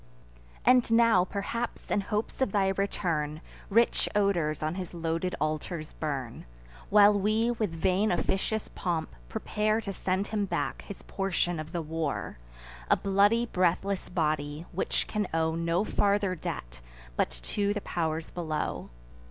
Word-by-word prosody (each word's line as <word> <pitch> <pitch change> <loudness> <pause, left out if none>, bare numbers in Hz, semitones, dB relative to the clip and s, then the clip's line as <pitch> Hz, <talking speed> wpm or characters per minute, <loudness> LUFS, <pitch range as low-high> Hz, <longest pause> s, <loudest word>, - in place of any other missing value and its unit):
And 250 -1 +5
now 230 -5 +5
perhaps, 220 +5 -4
in 205 - +3
hopes 210 +5 -3
of 260 - +2
thy 195 -1 +3
return, 170 -6 -1 0.3
Rich 230 +4 +3
odors 175 -8 +1
on 155 +1 0
his 180 -1 -6
loaded 165 +2 -1
altars 155 +1 -2
burn, 135 -6 -4 0.4
While 205 0 +7
we, 215 +4 +2
with 225 -4 -1
vain 185 +5 +1
officious 195 +4 0
pomp, 170 -3 -2 0.2
prepare 215 - 0
To 200 -3 -4
send 190 +1 0
him 210 -2 0
back 195 - -2
his 200 - -9
portion 175 -3 -1
of 155 +1 -6
the 170 -2 -2
war, 155 - -3 0.5
A - - +6
bloody 205 +4 +3
breathless 185 -1 0
body, 155 -2 -1
which 185 - -1
can 210 -2 -1
owe 160 0 +2
No 170 +3 +1
farther 200 -2 +2
debt, 65 - -6 0.3
but - - +2
to - - -2
the 205 0 -2
pow'rs 160 -3 -2
below. 160 -3 -3
185 Hz, 145 wpm, -29 LUFS, 160-205 Hz, 0.5 s, While